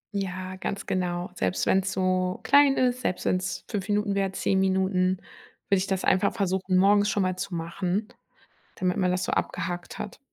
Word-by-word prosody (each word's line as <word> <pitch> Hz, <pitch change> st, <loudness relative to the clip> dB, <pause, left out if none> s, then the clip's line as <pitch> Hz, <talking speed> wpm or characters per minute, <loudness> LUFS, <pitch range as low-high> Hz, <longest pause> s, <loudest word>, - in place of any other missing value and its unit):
Ja, 185 Hz, -1 st, -4 dB
ganz 200 Hz, +1 st, -4 dB
genau. 180 Hz, 0 st, -2 dB
Selbst 95 Hz, -, -1 dB
wenn's 190 Hz, 0 st, +2 dB
so 185 Hz, 0 st, 0 dB
klein 285 Hz, -1 st, +5 dB
ist, 250 Hz, 0 st, +1 dB
selbst 185 Hz, -, -2 dB
wenn's 185 Hz, 0 st, -1 dB
5 205 Hz, -1 st, -4 dB
Minuten 205 Hz, 0 st, +1 dB
wäre, 195 Hz, -1 st, 0 dB
10 190 Hz, 0 st, 0 dB
Minuten, 190 Hz, -1 st, +2 dB, 0.5 s
würde 195 Hz, -, +4 dB
ich 190 Hz, -, -2 dB
das 190 Hz, -1 st, -1 dB
einfach 190 Hz, +2 st, +3 dB
versuchen, 190 Hz, -2 st, 0 dB
morgens 205 Hz, +2 st, +4 dB
schon 205 Hz, -2 st, +1 dB
mal 185 Hz, 0 st, 0 dB
zu 185 Hz, -1 st, -4 dB
machen, 180 Hz, +5 st, -2 dB, 0.7 s
damit 180 Hz, -1 st, -1 dB
man 180 Hz, -2 st, +2 dB
das 180 Hz, 0 st, -1 dB
so -, -, -2 dB
abgehakt 175 Hz, 0 st, -3 dB
hat. -, -, -6 dB
185 Hz, 180 wpm, -26 LUFS, 185-200 Hz, 0.7 s, klein